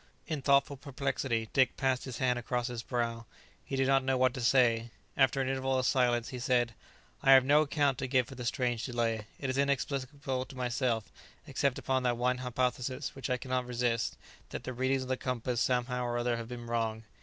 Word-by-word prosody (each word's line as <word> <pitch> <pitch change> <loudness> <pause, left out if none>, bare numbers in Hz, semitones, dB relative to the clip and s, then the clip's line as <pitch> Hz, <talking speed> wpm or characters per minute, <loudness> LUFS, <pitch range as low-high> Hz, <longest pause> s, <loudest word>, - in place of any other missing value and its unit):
In 155 -4 -3
thoughtful 140 0 +3
perplexity, 130 -4 -2
Dick 130 -2 +3
passed 130 -1 0
his 130 -3 -6
hand 125 -1 +1
across 120 0 -2
his 120 -2 -4
brow. 115 -2 -2 0.4
He - - -4
did 135 0 +2
not 135 0 +3
know 130 0 +1
what 130 -1 +3
to 125 - -5
say. 120 -2 +3 0.3
After 135 0 +3
an 130 - -1
interval 135 0 0
of 130 - 0
silence, 120 -3 +2
he 125 - -6
said, 120 -2 +1 0.5
"I 135 - +7
have 130 -1 +7
no 145 +2 +5
account 145 -3 +1
to 130 - -2
give 130 -2 +2
for - - -10
the 125 -1 -7
strange 120 -1 -1
delay. 115 -3 -1
It 135 -2 -1
is 130 - -1
inexplicable 140 -1 -1
to 135 -2 -12
myself, 120 -3 -1 0.3
except 140 -2 0
upon 130 0 0
that 120 -1 +1
one 125 +1 +1
hypothesis, 125 +2 -2
which 135 -1 -5
I 125 - +1
cannot 130 -1 -2
resist, 120 -2 -1 0.3
that - - -6
the 130 - -4
readings 130 +2 0
of - - -8
the 130 0 0
compass, 125 -2 -2
somehow 125 0 0
or 120 0 -1
other, 120 0 0
have 115 -1 -5
been 120 0 -7
wrong." 115 -1 -1
125 Hz, 210 wpm, -31 LUFS, 120-135 Hz, 0.5 s, I